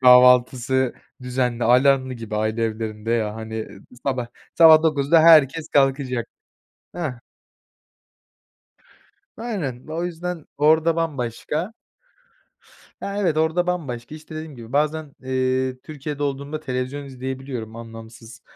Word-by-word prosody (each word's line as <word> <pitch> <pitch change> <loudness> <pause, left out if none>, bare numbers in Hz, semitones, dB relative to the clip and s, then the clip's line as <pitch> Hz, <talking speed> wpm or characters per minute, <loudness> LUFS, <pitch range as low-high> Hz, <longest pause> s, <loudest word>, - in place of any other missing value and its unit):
kahvaltısı 125 0 +5 0.3
düzenli 125 -2 -1
alarmlı 130 +1 +4
gibi 115 -2 -6
aile 110 +2 0
evlerinde 110 0 -4
ya, 110 -2 0
hani, 110 0 -7 0.2
ııı, - - -13 0.2
sabah 130 -3 -1 0.3
sabah 160 -2 +8
9'da 155 0 +3
herkes 160 -1 +6
kalkacak. 135 -4 +1 0.7
Hah. 170 -6 -2 2.2
Aynen, 185 - -4
o 165 +2 -3
yüzden 175 -1 -5
orada 160 +2 +4
bambaşka. 155 - -2 1.3
Ya, 200 0 -4
evet, 175 -6 +1
orada 160 +3 +1
bambaşka, 145 -8 -4
işte, 155 0 -11
dediğim 155 -3 -7
gibi, 115 0 -11
bazen, 150 0 0
eee, 130 0 0
Türkiye'de 150 -1 -6
olduğumda 140 +2 -3
televizyon 130 0 -4
izleyebiliyorum 130 -3 -6
anlamsız 115 0 -11
135 Hz, 110 wpm, -22 LUFS, 120-155 Hz, 2.2 s, sabah